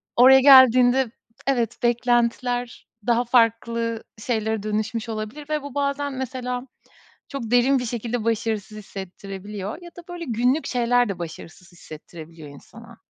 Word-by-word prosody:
oraya 265 +2 +8
geldiğinde 255 -2 +6 0.4
evet, 240 -4 0
beklentiler 240 0 0 0.2
daha 240 +1 +2
farklı 230 -1 +1 0.2
şeylere 220 -2 -2
dönüşmüş 215 +2 -3
olabilir 220 +7 -6
ve 305 -1 -1
bu 285 -1 -9
bazen 285 0 -1
mesela 255 0 -4 0.6
çok 250 -5 -6
derin 255 +2 +4
bir 245 - -3
şekilde 235 0 -3
başarısız 220 -2 -2
hissettirebiliyor 195 - -7
ya 345 - -10
da, 350 - -12
böyle, 350 -1 -6
günlük 250 +4 0
şeyler 245 -1 +2
de 190 -3 -4
başarısız 170 +2 -9
hissettirebiliyor 160 -1 -12
insana. 230 +11 -14
235 Hz, 130 wpm, -23 LUFS, 215-255 Hz, 0.6 s, oraya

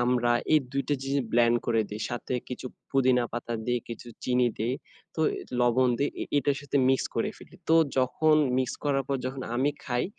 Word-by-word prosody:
আমড়া 120 -1 +2 0.2
এই 155 - +7
২ 140 - 0
টা 145 - +3
জিনিস 135 +1 0
ব্লেন্ড 120 0 +4
করে 115 -1 +3
দিই। 105 - -5
সাথে 120 +1 -3
কিছু 125 0 -6 0.2
পুদিনা 130 -2 +3
পাতা 120 0 -3
দিই, 120 -1 +1
কিছু 115 +1 -7 0.2
চিনি 125 -1 +3
দিই, 120 +4 0 0.4
তো - - -3 0.2
এ - - -5 0.2
লবণ 120 +1 +4
দেই, 145 - +2
এ - - -1
এটার 140 0 +1
সাথে 145 0 -2
মিক্স 135 0 +2
করে - - 0
ফেলি। - - -15
তো 165 - +5 0.2
যখন 155 +4 +3 0.2
মিক্স 130 -1 -1
করার 140 -1 +2
পর 140 - +1
যখন 130 0 -4
আমি 135 +4 +2
খাই 120 -2 0
125 Hz, 200 wpm, -28 LUFS, 120-135 Hz, 0.4 s, এই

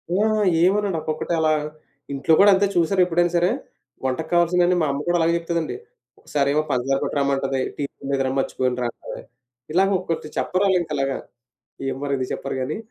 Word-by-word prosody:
ఆ! - - +2 0.5
ఏమనడు. 200 -2 +1
ఒక్కొక్కటే 155 +2 -3
అలా 155 -1 +3 0.6
ఇంట్లో 140 +4 +2
కూడా 205 +1 +8
అంతే. 195 +1 +3
చూశారా 180 +2 +3
ఎప్పుడైనా 175 0 +1
సరే, 175 +1 +3 0.6
వంటకు 155 +5 -2
కావాల్సినయన్నీ 175 +1 +3
మా 155 - +2
అమ్మ 140 - -3
కూడా 175 0 +3
అలాగే 165 +1 +3
చెప్తదండి. 170 -1 -2 0.4
ఒకసారేమో 145 +1 +1
పంచదార 130 +2 +1
పట్టు‌రమ్మంటది. 135 -1 0 0.2
టీపొడి 140 -1 -6
లేదురా 135 -1 +1
మర్చిపోయానురా 125 -2 -1
అంటది. - - -9 0.5
ఇలాగ 190 +3 +3
ఒకొక్కటి 165 -4 -4
చెప్పరు 185 +2 0
ఆళ్ళు 190 -1 +4
ఇంకలాగా. 140 -4 -2 0.8
ఎం - - -6
మరి 140 -1 -2
ఎందుకు 130 -1 -3
చెప్పరు 135 -1 -5
గానీ. 130 +7 -2
155 Hz, 160 wpm, -23 LUFS, 135-175 Hz, 0.8 s, కూడా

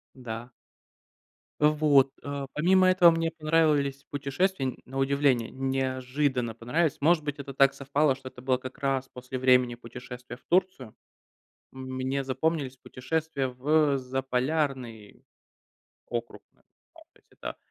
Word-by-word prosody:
Да. 120 -1 -7 1.1
Вот. 150 -3 +4
Э, 140 -1 -4
помимо 185 +4 +4
этого, 180 -2 +7
мне 165 0 0
понравились 155 -3 +1
путешествия. 140 0 -1
На 135 +1 -7
удивление, 135 -3 +2
неожиданно 130 -1 -1
понравились. 145 +7 0
Может 155 +1 +3
быть, 145 -1 -4
это 140 -1 -7
так 135 0 +4
совпало, 140 0 +1
что 130 -1 -9
это 125 - -14
было 130 0 +1
как 130 +1 -9
раз 135 -1 0
после 125 +1 -6
времени 125 -1 +4
путешествия 125 +1 -9
в - - -30
Турцию. 180 - 0 0.8
Мне 130 +1 -3
запомнились 135 0 -1
путешествия 140 +1 -3
в 140 +3 +2
Заполярный 130 -3 -2 0.9
округ. - - -5
Ну, - - -33 0.5
кстати, - - -28
да. - - -5
135 Hz, 120 wpm, -28 LUFS, 130-150 Hz, 1.1 s, этого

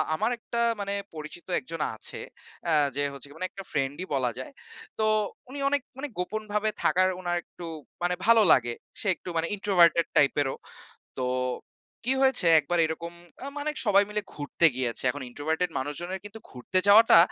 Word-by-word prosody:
আমার 220 +8 0
একটা 235 0 -4 0.2
মানে 200 0 -2 0.2
পরিচিত 155 +3 -8
১ - - -18
জন 165 -2 -4
আছে - - -8 0.5
আ - - +2 0.2
যে 145 - 0
হচ্ছে 140 0 -10
মানে 185 - -2
একটা 195 - -9
ফ্রেন্ডই 145 +4 -2
বলা 125 -3 +1
যায়। 130 - -7 0.5
তো - - +2 0.5
উনি 280 +2 -7
অনেক 285 0 +1 0.2
মানে 280 +2 -4
গোপনভাবে 210 +3 -1
থাকার 185 +1 +4
উনার 175 -1 -1
একটু 175 - -11 0.4
মানে 180 0 +1
ভালো 230 0 +6
লাগে 120 -2 +4 0.3
সে - - -3
একটু - - -9
মানে 165 +1 +1
introverted 175 -5 +4
টাইপেরও। 140 -1 +3 0.6
তো, - - -1 0.8
কী 250 - +2
হয়েছে? 265 -9 +3
একবার 175 +4 -2
এরকম 165 +2 -5 0.3
আ - - -5
মানে 295 +1 -1 0.2
সবাই 200 -1 +5
মিলে 210 0 -1
ঘুরতে 145 +3 +2
গিয়েছে। 120 -3 -1
এখন 145 +2 -6
introverted 160 +7 -1
মানুষজনের 175 +7 -4
কিন্তু 205 +2 -9
ঘুরতে 130 +9 0
যাওয়াটা 215 -2 +8
175 Hz, 165 wpm, -27 LUFS, 145-205 Hz, 0.8 s, যাওয়াটা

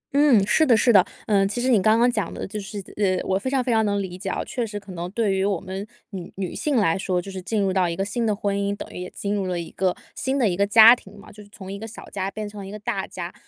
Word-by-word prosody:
嗯， 280 -9 +5
是 315 - +3
的 250 -7 +5
是 240 +2 +4
的。 190 -3 +7 0.2
呃， 200 -2 +3
其 210 +5 -3
实 255 +2 0
你 225 -6 +4
刚 215 +3 +4
刚 240 +1 +4
讲 210 -7 -2
的 - - -5
就 210 +2 -5
是 200 +1 -7 0.2
呃， 190 -3 +2
我 190 0 +1
非 260 - -3
常 265 -2 +1
非 250 - -1
常 220 -1 +3
能 205 -1 0
理 185 -2 -5
解 190 +1 -5
啊。 - - -2
确 245 - -3
实 205 -2 -5
可 195 -1 -12
能 175 0 -5
对 210 0 0
于 190 0 0
我 195 -3 0
们 190 +3 -6 0.2
女 185 -3 -7
女 190 -2 -3
性 300 -3 -1
来 200 -9 +3
说， 185 -1 -1
就 195 +2 -7
是 190 -1 -6
进 210 +4 -2
入 195 -2 +1
到 185 -2 +2
一 170 - -3
个 195 - -1
新 220 +4 -2
的 215 -2 +1
婚 200 -1 -1
姻， 200 0 -1
等 - - -7
于 - - -7
也 180 - -6
进 200 0 -4
入 195 -2 -1
了 180 -1 -2
一 170 - -7
个 185 -1 0 0.2
新 265 +1 -1
的 245 - +3
一 180 - 0
个 200 +2 +1
家 225 +3 +9
庭 205 -4 -16
嘛， 200 - -14
就 210 - -13
是 205 - -15
从 195 -2 -9
一 200 - -6
个 225 - -6
小 220 - -11
家 195 -1 -2
变 215 +1 -5
成 205 -1 -9
了 195 - -8
一 - - -8
个 210 - -7
大 200 -2 -3
家。 175 0 -7
200 Hz, 345 characters per minute, -23 LUFS, 190-220 Hz, 0.2 s, 家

